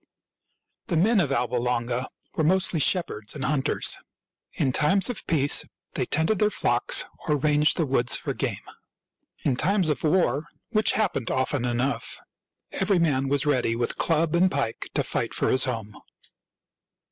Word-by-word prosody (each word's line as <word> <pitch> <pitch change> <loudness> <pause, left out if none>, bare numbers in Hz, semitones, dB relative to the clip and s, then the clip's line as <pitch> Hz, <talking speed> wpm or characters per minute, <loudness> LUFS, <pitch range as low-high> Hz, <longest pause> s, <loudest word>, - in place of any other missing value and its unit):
The 170 - 0
men 210 +6 +3
of 150 -7 +1
Alba 125 -2 0
Longa 120 +1 -1 0.3
were 160 - -1
mostly 185 0 +2
shepherds 145 - +1
and 140 -1 -4
hunters. 140 -3 +1 0.5
In 130 - 0
times 190 - +2
of 220 -2 -6
peace 145 -3 +3 0.3
they - - -2
tended 160 +7 +1
.their 210 - +3
flocks - - 0 0.2
or 150 - +2
ranged 150 +1 +2
the 165 - +1
woods 125 -3 +1
for - - -4
game. - - -4 0.8
In 135 - +1
times 185 +4 +1
of 150 - -1
war 155 -3 +1
— - - -51
which 215 -3 +3
happened 205 - -1
often 130 -1 -1
enough 125 +3 -2 0.3
— - - -41
every 200 - +2
man 140 -6 +1
was 140 0 +1
ready 125 -5 +1
with 120 0 -2
club 165 0 +1
and 185 +2 +4
pike 140 -8 -3
to - - +2
fight - - -2
for - - +1
his 130 +1 +4
home. 110 -5 -4
145 Hz, 165 wpm, -25 LUFS, 130-170 Hz, 0.8 s, and